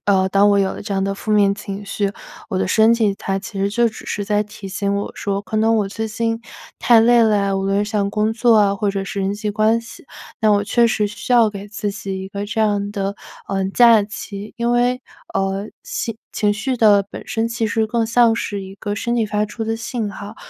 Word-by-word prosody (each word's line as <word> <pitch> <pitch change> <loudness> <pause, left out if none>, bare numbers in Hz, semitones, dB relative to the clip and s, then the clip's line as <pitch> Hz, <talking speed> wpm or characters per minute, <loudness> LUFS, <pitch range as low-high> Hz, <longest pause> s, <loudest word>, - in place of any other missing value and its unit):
呃， 190 -2 +3
当 200 +2 +4
我 200 - +4
有 195 -1 +1
了 - - -8
这 200 -1 -5
样 195 - 0
的 195 0 -1
负 215 +2 -6
面 200 -1 +4
情 200 -1 -7
绪， 200 0 -2 0.4
我 185 - -1
的 185 - 0
身 220 +3 +5
体 215 -4 +1
它 195 0 -2
其 200 0 -8
实 200 +1 0
就 235 +2 +2
只 215 - -11
是 205 - -3
在 210 0 +2
提 210 -2 -10
醒 200 +1 -1
我 200 - -2
说 200 -1 -2
可 215 0 -5
能 225 +1 +3
我 205 -2 0
最 220 +2 -4
近 225 +1 -2 0.4
太 235 -2 +5
累 235 +1 +5
了 215 -1 +3
呀， 200 -1 0
无 195 - -1
论 195 +1 +1
是 210 - -7
像 205 -2 0
工 215 +1 +1
作 235 0 +3
啊 200 -1 +4
或 205 0 0
者 195 0 -3
是 195 0 -4
人 195 +1 0
际 210 0 -3
关 215 +2 +2
系， 230 +3 -13 0.4
那 215 -2 +4
我 205 0 +3
确 235 +3 +3
实 210 -2 +1
需 210 +4 -5
要 230 -3 +6
给 200 -1 -8
自 205 0 -3
己 195 -1 -5
一 190 - -7
个 200 +1 -5
这 220 +1 -2
样 205 -1 +1
的， 200 -1 -3 0.3
呃， 195 -1 -1
假 230 -1 +6
期， 205 -1 -8
因 235 0 0
为， 245 +1 +2 0.3
呃， 195 +1 -1 0.2
情 230 - -4 0.2
情 210 -1 +1
绪 245 +5 -2
的 210 -3 +5
本 - - -9
身 225 0 -1
其 230 -1 -1
实 220 +1 0
更 230 0 0
像 230 -1 +4
是 205 -3 -3
一 190 0 -9
个 205 0 -4
身 235 +2 -2
体 230 - +2
发 210 0 0
出 220 +2 -5
的 225 0 -1
信 225 -2 -3
号。 205 +3 -9
210 Hz, 265 characters per minute, -20 LUFS, 200-225 Hz, 0.4 s, 要